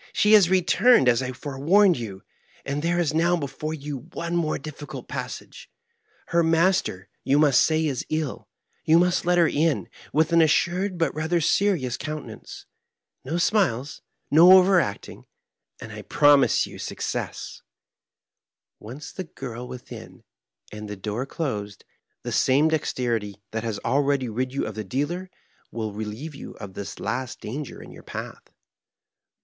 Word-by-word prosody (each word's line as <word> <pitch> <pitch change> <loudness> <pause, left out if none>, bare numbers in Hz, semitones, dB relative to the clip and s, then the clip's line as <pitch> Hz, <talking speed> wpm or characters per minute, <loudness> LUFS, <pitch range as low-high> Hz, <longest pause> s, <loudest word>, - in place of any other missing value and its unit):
"She 210 +1 +4
has 200 -5 +7
returned, 190 - +4
as 120 0 +4
I 130 0 -3
forewarned 150 +9 +2
you, 105 -6 -7 0.4
and 140 +1 -2
there 170 +2 0
is 160 -4 0
now 170 +2 +2
before 155 +1 -4
you 145 -3 -7
one 170 +1 -3
more 165 -3 0
difficult 150 0 -9
passage. - - -7 0.6
Her 170 -1 +3
master, 165 - +1 0.2
you 135 +2 +2
must 145 -3 +5
say, 160 0 +1
is 135 -5 -2
ill; 155 -3 -3 0.4
you 160 +1 +5
must 180 0 +2
let 180 0 +3
her 170 -2 +5
in, 155 +1 0 0.2
with 160 +2 +2
an 170 - +6
assured 180 +4 +1
but 165 - 0
rather 160 +3 0
serious 160 -7 +1
coun 155 0 -5
tenance - - -11 0.3
— - - -51
^no 165 +5 -1
smiles, 150 - 0 0.3
no 170 +5 +8
overacting, 185 - +1 0.5
and - - -9
I - - -7
promise 145 -1 +4
you - - -11
success - - -5 1.2
1 110 +3 -9
Once 150 - -9
the 185 - -6
girl 125 -5 -8
within, 125 0 -10 0.5
and 105 0 -8
the 105 - -5
door 105 +6 -4
closed, 105 -11 -4 0.4
the - - -4
same 145 +4 +3
dexterity 115 -9 -2
that 115 0 -3
has 110 -3 -3
already 140 -2 +1
rid 125 +4 -2
you 140 - -2
of - - -5
the 110 - -5
dealer 145 - -3 0.4
will 110 -2 -4
relieve 110 +9 -6
you 140 - -9
of 100 -2 -10
this 100 -2 -7
last 130 0 -3
danger 135 +5 -6
in - - -12
your - - -12
path. - - -8
145 Hz, 155 wpm, -24 LUFS, 125-170 Hz, 1.2 s, no